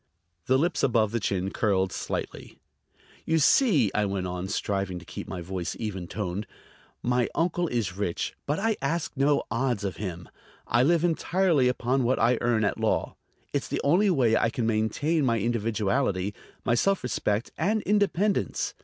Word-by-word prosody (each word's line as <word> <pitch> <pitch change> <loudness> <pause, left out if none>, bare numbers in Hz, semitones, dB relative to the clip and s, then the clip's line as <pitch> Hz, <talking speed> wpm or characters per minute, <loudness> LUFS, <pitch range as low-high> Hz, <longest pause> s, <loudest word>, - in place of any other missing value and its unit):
The 130 - +4
lips 160 +1 0
above 115 -5 +2
the 115 - 0
chin 95 -2 -1
curled 95 -3 +1
slightly. - - -5 0.7
"You 160 - +1
see," 155 - +4
I 105 - +1
went 100 -2 -2
on, 90 +1 -4
striving 95 -2 -2
to 90 - -10
keep - - -7
my 90 - -5
voice 90 0 -4
even 95 -6 -4
toned, 100 0 -4 0.6
"my 125 0 +1
uncle 175 +1 +1
is 115 - -2
rich, 95 -4 -2
but 145 +2 0
I 220 +1 0
ask 160 +4 -1
no 140 +1 +2
odds 115 -2 0
of 95 -2 -3
him. 90 -5 -5 0.4
I 120 - +2
live 165 +5 +3
entirely 170 -4 +2
upon 125 +1 +1
what 125 +2 +2
I 120 +1 +3
earn 120 -2 +2
at 100 - 0
law. - - 0 0.4
It's - - -1
the - - -2
only 180 +9 +4
way 125 -10 +3
I 115 - +2
can 115 0 -2
maintain 115 +9 +1
my 115 -3 +2
individuality, 105 -2 0 0.3
my 120 - +2
self 195 +11 +2
respect 105 -2 -1
and 210 +7 0
independence. 205 0 +1
120 Hz, 170 wpm, -27 LUFS, 100-155 Hz, 0.7 s, The